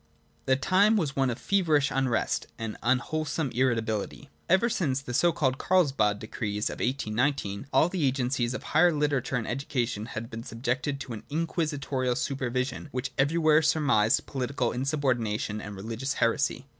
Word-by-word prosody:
The 130 - +5
time 195 +10 +3
was 150 -8 -1
one 135 -1 +2
of 120 - -2
feverish 160 -8 +2
unrest 130 -3 0
and 115 -1 -4
unwhole 130 +6 0
some 150 -5 -2
irritability. 120 +1 -1 0.2
Ever 190 +6 +4
since 165 - 0
the 130 -3 -7
so 170 +7 +4
called 130 -5 0
Carlsbad 135 - +2
decrees 105 -1 -3
of - - -8
1819 125 -2 -1
all 155 - +4
the 175 -3 -2
agencies 130 -1 0
of - - -5
the - - -11
higher 175 +3 +5
literature 145 -4 0
and 120 -3 -2
education 120 -5 -2
had 115 0 -6
been 115 0 -5
subjected 130 +5 -2
to 125 - -6
an 105 - -6
inquisitorial 145 -5 -1
supervision 130 +1 -2
which 125 0 -3
everywhere 155 +2 +4
surmised 145 -9 +3
political 130 -2 -2
insub 135 +4 -2
ordination 110 -4 0
and 105 0 -7
religious 115 +7 -3
heresy. 125 +3 0
130 Hz, 160 wpm, -28 LUFS, 120-150 Hz, 0.2 s, The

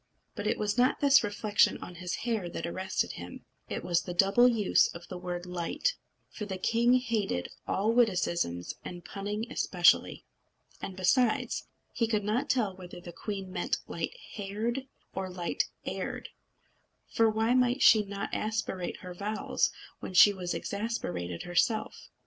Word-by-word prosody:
But 205 -1 -4
it 220 - +1
was 210 +3 -1
not 250 +1 +3
this 280 -3 +6
reflection 205 0 +2
on 180 - -9
his 180 -1 -2
hair 220 -7 -1
that - - -4
arrested 185 +2 -1
him; - - -9 0.2
it - - -3
was 175 -1 +2
the 180 - -6
double 200 +7 +5
use 225 -5 +4
of 170 +1 -9
the 185 - -5
word 175 0 -4
light. 180 - -1 0.4
For 215 - -6
the 190 -2 -4
king 235 +6 +3
hated 220 - 0 0.2
all 210 +4 +1
witticisms, 175 - +1
and 175 -1 -8
punning 205 +2 -4
especially. 175 -1 +3 0.6
And 190 - -5
besides, 225 +5 +2 0.3
he 230 - +1
could 215 -2 0
not 215 +5 0
tell 225 -7 +1
whether 180 -1 -10
the 175 0 -10
queen 195 0 -5
meant - - 0
light - - -4 0.2
haired 225 +6 -3 0.3
or 190 0 -3
light 180 -2 -1 0.2
heired; - - -4 0.8
for 225 -1 +3
why 220 +2 +2
might 250 +1 +3
she 220 - +8
not 200 0 -5
aspirate 215 -4 -2
her 180 0 -7
vowels 210 +4 0 0.3
when 185 - -7
she 205 +2 +9
was 180 -2 -3
exasperated 90 - -3
herself? 175 +6 0
205 Hz, 155 wpm, -30 LUFS, 180-225 Hz, 0.8 s, she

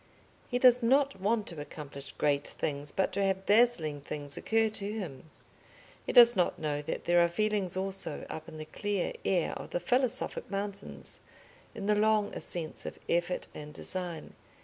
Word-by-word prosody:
He 245 - +1
does 250 0 +6
not 270 -2 +3
want 215 +1 +1
to 165 -4 -7
accomplish 140 -2 -8
great 145 -1 +1
things, 145 0 -3
but 190 - 0
to 200 - +1
have 190 0 0
dazzling 200 -10 +3
things 145 0 -5
occur 225 0 +2
to 205 -1 -4
him. 160 -9 -6 0.8
He - - 0
does 240 -1 +8
not 180 -2 +1
know 150 -2 -2
that 150 - -4
there 175 0 +5
are 170 - +2
feelings 200 -1 0
also 195 0 -3
up 160 0 -7
in 155 - -10
the 155 - -6
clear 205 +3 -2
air 180 -4 +1
of - - -7
the - - -1
philosophic 250 +7 0
mountains, 200 0 -5 0.6
in 200 - -5
the 210 - +4
long 215 0 +2
ascents 165 -3 -4
of - - -6
effort 175 +1 0
and 150 0 -9
design. 180 -3 -2
190 Hz, 170 wpm, -31 LUFS, 155-215 Hz, 0.8 s, does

